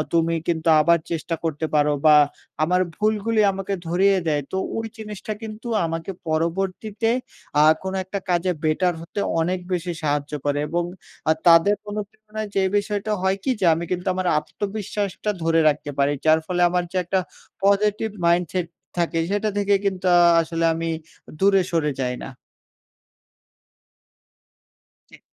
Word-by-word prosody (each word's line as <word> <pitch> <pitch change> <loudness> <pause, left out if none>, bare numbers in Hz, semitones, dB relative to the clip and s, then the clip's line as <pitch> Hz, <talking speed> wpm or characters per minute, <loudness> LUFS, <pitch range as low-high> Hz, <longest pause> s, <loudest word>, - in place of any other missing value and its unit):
তুমি 165 0 +2
কিন্তু 165 -1 0
আবার 170 +2 +4
চেষ্টা 165 0 -2
করতে 160 -1 -1
পারো।" 150 0 +3
বা 150 - +8 0.5
আমার 180 +3 +2 0.2
ভুলগুলি 215 +1 +1
আমাকে 195 +1 -3
ধরিয়ে 190 +3 +3
দেয়। 150 -2 +1
তো 190 - -1 0.2
ঐ - - -1 0.2
জিনিসটা 210 0 -6
কিন্তু 220 +2 -7 0.2
আমাকে 165 +2 -4 0.2
পরবর্তীতে 190 +7 -1 0.5
আ - - +6 0.2
কোনো 190 0 -3
একটা 200 +2 -4
কাজে 180 +1 +2
বেটার 175 +3 +2
হতে 170 +5 -5 0.2
অনেক 180 +3 0
বেশি 175 0 -1
সাহায্য 145 -1 -1
করে। 145 0 +1
এবং 175 +2 0 0.5
আ - - +7
তাদের 170 +4 +7 0.2
অনুপ্রেরণায় 215 +1 -6
যে 195 - +3 0.2
বিষয়টা 205 +1 -2
হয় 190 +1 +2
কি? - - 0
যে 185 - +3
আমি 165 +2 -3
কিন্তু 180 +1 -3
আমার 185 -1 -2
আত্মবিশ্বাসটা 205 +3 -3
ধরে 165 0 +3
রাখতে 145 0 -1
পারি। 140 +1 +3
যার 155 0 +5
ফলে 180 0 -1
আমার 180 0 0
যে - - -4
একটা 190 +2 0 0.5
positive 210 +2 +2
mindset 175 0 +1 0.3
থাকে 170 -1 0
সেটা 205 +1 0
থেকে 200 0 +2
কিন্তু 190 -2 -1
আ - - +6 0.2
আসলে 165 0 -2
আমি 165 0 -3 0.5
দূরে 195 -1 +5
সরে 160 -3 +1
যাই 125 -1 -1
না। - - -6 2.8
জি। - - -15
180 Hz, 150 wpm, -23 LUFS, 165-200 Hz, 2.8 s, বা